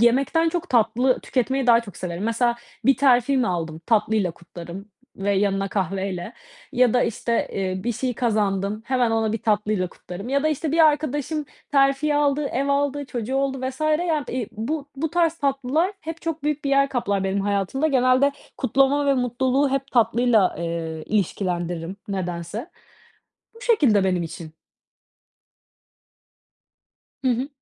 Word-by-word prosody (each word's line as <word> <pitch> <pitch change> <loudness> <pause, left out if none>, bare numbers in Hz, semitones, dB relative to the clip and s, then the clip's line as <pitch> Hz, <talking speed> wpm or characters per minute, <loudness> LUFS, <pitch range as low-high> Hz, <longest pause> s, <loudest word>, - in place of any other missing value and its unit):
yemekten 275 +8 +3
çok 350 +1 -3
tatlı 245 +2 +2
tüketmeyi 265 +1 -1
daha 235 -1 +6
çok 200 -6 -11
severim. 180 +2 -4
Mesela 235 +1 +1 0.3
bir 270 0 +5
terfi 260 0 +4
mi 250 -2 +2
aldım? 165 -3 -3
Tatlıyla 210 -4 +2
kutlarım 175 +4 -10 0.3
ve 200 +1 0
yanına 195 0 +1
kahveyle 190 0 -3 0.4
ya 250 -1 +3
da, 245 - +4
işte, 230 +1 -1
eee, 185 0 -3
bir 240 - 0
şey 250 +2 -2
kazandım, 210 -3 0
hemen 250 -2 +2
onu 225 -1 +1
bir 225 - -1
tatlıyla 210 -3 +1
kutlarım 185 +7 -9
ya 280 +1 +1
da, 310 - +2
işte, 305 0 -2
bir 330 - +1
arkadaşım 295 0 0 0.3
terfi 275 +2 +3
aldı, 290 0 +2
ev 275 +1 -1
aldı, 285 0 0
çocuğu 245 0 -4
oldu 270 0 0
vs. 260 +2 -4
yani, 310 -1 +1
eee, 240 -4 -3
bu 280 +7 -4
bu 310 +2 -2
tarz 335 -2 +2
tatlılar 280 +6 0
hep 325 0 -7
çok 325 -2 -3
büyük 300 -1 -1
bir 275 - 0
yer 275 0 +4
kaplar 200 -7 -1
benim 195 +1 0
hayatımda. 200 +8 0
Genelde 260 0 +3 0.2
kutlama 275 +2 +2
ve 275 - +4
mutluluğu 260 +2 +1
hep 275 0 -2
tatlıyla, 235 -4 +3
eee, 165 -2 -4
ilişkilendiririm 180 -3 -2
nedense. 185 - -4 0.8
Bu 455 - -16
şekilde 285 - +3
benim 180 -2 +1
için. 165 -1 -8 2.7
Hı 255 - +3
hı. 250 +3 -1
245 Hz, 150 wpm, -23 LUFS, 200-280 Hz, 2.7 s, daha